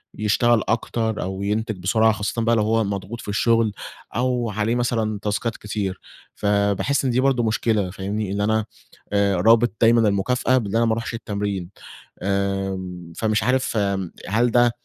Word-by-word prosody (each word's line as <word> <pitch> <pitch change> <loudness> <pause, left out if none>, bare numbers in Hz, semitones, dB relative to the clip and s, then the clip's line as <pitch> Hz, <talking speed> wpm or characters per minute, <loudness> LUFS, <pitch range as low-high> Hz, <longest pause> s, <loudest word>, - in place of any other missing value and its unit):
يشتغل 110 +2 +2
أكتر 115 -1 -1
أو 95 +1 -4
ينتج 110 +1 -1
بسرعة، 110 +4 +3
خاصةً 105 +2 -2
بقى 115 +1 +3
لو 110 - +2
هو 110 +1 +2
مضغوط 100 +3 -4
في - - -12
الشغل 115 +2 +2 0.4
أو 125 -1 0
عليه 110 +3 0
مثلًا 115 -4 -1
تاسكات 110 +3 -2
كتير، 100 -3 -4 0.4
فباحس 100 +7 +1
إن 125 - +2
دي 125 - +1
برضو 130 -2 +2
مشكلة، 110 -3 +1
فاهمني، 100 +1 -3
إن 100 0 -1
أنا 110 +1 +1 0.5
آآ 100 -1 +3
رابط 115 +6 +4
دايمًا 115 -1 +5
المكافأة 125 +6 +1
بأن 110 -4 -2
أنا 115 +1 +3
ما 110 - +2
روحش 115 +1 -4
التمرين، 100 -5 -3 0.5
آمم، 95 -3 -2
فمش 110 -1 +1
عارف 125 -2 +1 0.5
هل 115 +3 +2
ده 120 0 +4
110 Hz, 160 wpm, -22 LUFS, 100-115 Hz, 0.5 s, دايمًا